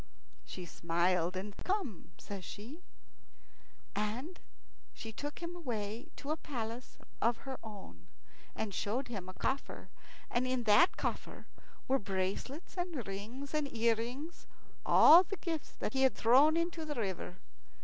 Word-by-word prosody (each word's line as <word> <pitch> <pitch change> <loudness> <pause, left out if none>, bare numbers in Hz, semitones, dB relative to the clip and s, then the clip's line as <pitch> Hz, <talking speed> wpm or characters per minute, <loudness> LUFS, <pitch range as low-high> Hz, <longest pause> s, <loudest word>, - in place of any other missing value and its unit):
She 180 - -7
smiled, 175 +2 +1
and 200 +2 -5
"Come!" 360 - -2
says 200 -2 -7
she, 235 - -8 1.1
and 230 - -2 0.8
took 290 +6 -5
him 340 +1 -4
away 230 -8 -4
to 285 - -4
a 310 - +1
palace 240 -5 -5 0.2
of 235 0 +3
her 265 -1 -4
own, 190 - -10 0.5
and 215 -2 -2
showed 240 +8 -1
him 195 -6 -5
a 185 - -9
coffer; 270 +1 -2 0.4
and 245 +1 +1
in 255 -1 0
that 215 - +6
coffer - - -3 0.4
were 270 +1 +3
bracelets 195 - -3
and 340 - -2
rings 225 +9 -6
and 300 -2 0
earrings 235 +7 -1 0.4
all 335 +3 +10
the 395 +1 -4
gifts 325 -2 -4
that - - -3
he 265 - +1
had 265 -2 +5
thrown 275 +8 +6
into 335 -1 -1
the 300 -1 -3
river. 190 -4 -3
240 Hz, 140 wpm, -34 LUFS, 205-295 Hz, 1.1 s, all